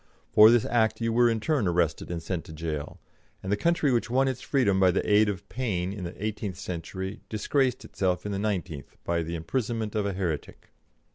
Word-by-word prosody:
For 105 +1 +9
this 120 -1 +4
act 110 -2 +1
you 115 -1 0
were 120 0 +5
in 115 -1 0
turn 135 - +1
arrested 85 -3 0
and 85 -2 -4
sent 90 -1 -3
to 80 - -10
jail, 75 -2 -5 0.4
and 95 - -3
the - - +4
country 165 +4 +2
which 120 -1 +1
won 135 +2 +3
its 130 -3 -2
freedom 110 -9 +2
by 95 -1 +5
the 90 - 0
aid 105 0 +5
of 95 -4 -5
Paine 95 -7 -2
in 100 -3 -6
the 90 +4 -6
eighteenth 105 -4 -3
century 95 +3 -5
disgraced 130 +4 0
itself 90 -1 -1
in 105 - -2
the 100 - -2
nineteenth 90 -8 -3
by 85 0 0
the 85 +1 -4
imprisonment 110 +5 -2
of 105 -2 0
a 100 - -2
heretic. 90 -5 -4
100 Hz, 210 wpm, -27 LUFS, 90-115 Hz, 0.4 s, For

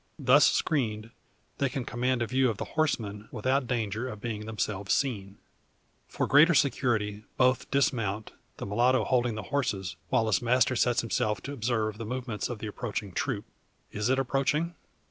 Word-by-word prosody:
Thus 140 0 +6
screened, 115 -7 0 0.5
they 140 - +2
can 130 -1 -4
command 125 0 0
a - - 0
view 130 +2 +2
of 110 - -3
the - - -4
horsemen, 110 -9 -1
without 130 +3 0
danger 115 0 -2
of 105 - -7
being 105 -1 -5
themselves 105 -2 -1
seen. 100 -7 -2 0.7
For - - -2
greater 155 +4 +6
security 115 -6 +1
both 130 0 +2
dismount; 115 -8 0 0.3
the - - -5
mulatto 120 +6 +2
holding 125 -3 +1
the 110 - -5
horses, 95 - -1
while 115 - +2
his 105 -4 +1
master 125 +2 +3
sets 120 +1 +2
himself 105 -3 -1
to 140 - -6
observe 110 -4 -1
the 115 - -4
movements 125 -3 -3
of 120 - -4
the 110 - -7
approaching 105 -1 -4
troop. 105 +2 -2 0.5
Is 105 +3 -1
it 130 - +3
approaching? 140 +5 0
120 Hz, 165 wpm, -28 LUFS, 105-130 Hz, 0.7 s, Thus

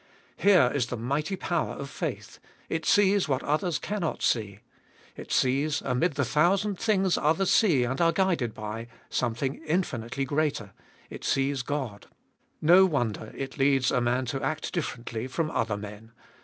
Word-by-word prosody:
Here 180 -11 +5
is 135 -4 0
the 120 - -4
mighty 140 - -2
power 175 -3 -2
of 140 - -6
faith; - - -5 0.3
it 160 -1 -2
sees 200 -4 +4
what 135 -1 0
others 155 +3 0
cannot 190 -1 -3
see. 105 -4 0 0.6
It - - -10
sees, 140 +4 +2
amid 135 +6 +1
the 140 -1 +1
thousand 185 - +2
things 195 -5 +2
others 160 +5 +2
see 165 - +4
and 130 +6 -2
are 165 0 +5
guided 170 - 0
by, 110 +2 -6 0.2
something 125 +4 -1
infinitely 135 -6 -2
greater 140 -8 -1 0.2
— - - -29
it - - -8
sees 135 0 0
God. 130 -7 -4 0.6
No 175 +5 +7
wonder 120 - -2
it 135 +1 -6
leads 135 -1 +3
a 125 - +1
man 125 +2 +1
to 135 +2 -3
act 155 +3 -3
differently 120 -7 -4
from 155 +4 -2
other 110 -7 -1
men. 105 +2 -10
140 Hz, 160 wpm, -27 LUFS, 120-165 Hz, 0.6 s, No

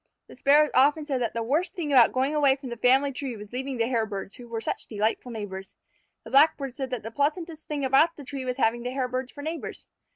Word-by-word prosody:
The - - -14
Sparrows 295 +2 +4
often 295 +3 +4
said 270 -4 -2
that 235 -2 -2
the 230 - -1
worst 300 +10 0
thing 305 -5 -2
about 245 -4 +7
going 265 +3 0
away 285 -3 +4
from 270 -2 -9
the 235 - -5
family 265 +4 +3
tree 260 -3 -5
was 210 +2 -11
leaving 265 +1 -3
the 230 - +2
Hairbirds, 220 -5 -2
who 245 - -11
were 230 -1 -4
such 225 - -4
delightful 220 +3 -1
neighbors. 195 -4 -7 0.5
The - - -11
Blackbirds 275 -2 +3
said 265 -2 -3
that 250 -3 -4
the 225 - -6
pleasantest 315 +4 -2
thing 290 -2 -2
about 310 +6 +4
the 290 - -10
tree 265 +1 -5
was 250 0 -3
having 235 -2 +1
the 245 - -3
Hairbirds 255 0 -3
for 285 - -10
neighbors. 320 +2 -5
260 Hz, 235 wpm, -26 LUFS, 235-285 Hz, 0.5 s, about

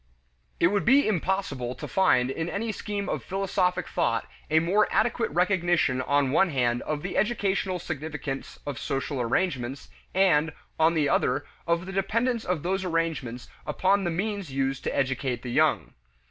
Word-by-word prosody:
It 170 - +5
would 205 +1 +1
be 270 +5 +5
impossible 175 - -1
to - - -7
find 130 -9 +3
in 160 +4 -3
any 220 +4 -2
scheme 205 -1 -4
of - - -2
philosophic 190 -1 0
thought - - 0 0.2
a 155 - +3
more 180 +6 +3
adequate 235 +1 +1
recognition 175 -6 +2
on 140 0 +2
one 190 +6 +4
hand 120 -4 +1
of 150 -1 -3
the 180 - -4
educational 195 -3 0
significance 150 -4 -5
of 140 -5 -4
social 135 0 -2
arrangements 130 0 -1 0.3
and, 160 -5 +3 0.3
on 160 +1 +4
the 150 -2 +2
other, 135 +2 +1 0.2
of 170 +1 +1
the 190 - -6
dependence 230 +5 0
of 180 -5 -1
those 190 +2 0
arrangements 165 -9 -2 0.2
upon 195 +1 +2
the 175 - 0
means 195 -1 -3
used 135 0 -1
to - - -1
educate 130 -2 -1
the 125 - -4
young. - - +2
170 Hz, 160 wpm, -27 LUFS, 135-195 Hz, 0.3 s, It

